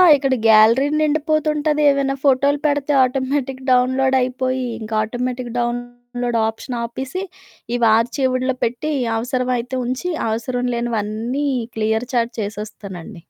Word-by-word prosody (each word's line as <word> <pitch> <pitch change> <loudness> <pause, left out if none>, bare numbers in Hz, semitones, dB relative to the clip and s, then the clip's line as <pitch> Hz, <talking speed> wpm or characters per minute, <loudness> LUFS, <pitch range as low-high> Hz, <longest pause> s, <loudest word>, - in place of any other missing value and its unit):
ఇక్కడ 270 -1 0
గ్యాలరీ 225 +5 +6
నిండిపోతుంటాది. 305 0 +1
ఏవైనా 275 -1 +1
ఫోటోలు 280 +1 +3
పెడతే 290 0 +1
ఆటోమేటిక్ 265 +1 -1
డౌన్లోడయిపోయి, 255 0 +1
ఇంక 220 -1 -8
ఆటోమేటిక్ 245 +1 -4
డౌన్లోడ్ 245 0 -3
ఆప్షన్ 225 +3 -5
ఆపిసి, 265 +10 -4 0.5
ఇవి 235 -2 +3
ఆర్చీవ్డ్‌లో 255 +2 0
పెట్టి, 250 +7 -2 0.2
అవసరమైతే 250 +1 -1
ఉంచి, 260 +9 -2 0.2
అవసరం 245 +3 -2
లేనివన్నీ 235 +4 -2 0.3
క్లియర్ 220 +2 0
చాట్ 235 0 +1
చేసేస్తానండి. 205 -3 -7
250 Hz, 105 wpm, -20 LUFS, 235-270 Hz, 0.5 s, గ్యాలరీ